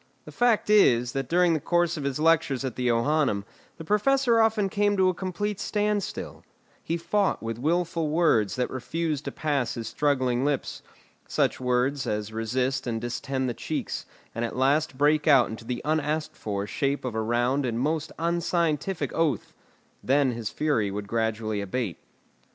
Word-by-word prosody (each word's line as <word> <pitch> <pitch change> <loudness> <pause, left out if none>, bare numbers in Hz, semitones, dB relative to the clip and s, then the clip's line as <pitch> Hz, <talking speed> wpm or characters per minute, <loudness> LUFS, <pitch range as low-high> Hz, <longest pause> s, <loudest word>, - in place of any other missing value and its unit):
The - - -10
fact 235 -3 +2
is, 125 - +5
that 135 -1 -3
during 175 0 +4
the 160 - +1
course 175 +2 +1
of 150 -3 -5
his 140 0 -2
lectures 150 -5 +2
at 130 - -4
the 125 -1 -1
Johannæum, 120 -2 +2 0.3
the 165 - -8
Professor 235 +4 +3
often 220 -2 +2
came 205 +1 +1
to 190 -1 +4
a - - 0
complete 195 +3 -3
standstill; 210 -1 -2 0.4
he 165 - -1
fought 185 - 0
with 115 0 -4
wilful 165 +2 0
words 150 - +2
that 125 -1 -1
refused 150 +3 -3
to - - -3
pass 140 -6 -1
his 115 -1 -5
struggling 130 -4 +1
lips, 145 -1 -2 0.5
such - - 0
words 130 +2 0
as 105 0 -3
resist 125 +4 -1
and 115 -1 -1
distend 130 +3 -3
the 120 - -1
cheeks, - - -4 0.3
and 115 - -3
at 115 - -3
last 140 +2 +1
break 150 +2 +3
out 135 -5 +6
into 110 +1 -8
the 120 0 -4
unasked 155 0 -1
for 100 -2 -3
shape 140 +5 -1
of 125 - -3
a 110 - -1
round 120 +5 +1
and 120 -2 -1
most 155 +4 -1
unscientific 170 +1 -1
oath: 155 -9 0 0.5
then 135 0 +3
his 115 -2 -4
fury 145 -10 0
would 100 +1 -5
gradually 110 -1 -1
abate. 100 -1 -3
140 Hz, 170 wpm, -26 LUFS, 120-170 Hz, 0.5 s, out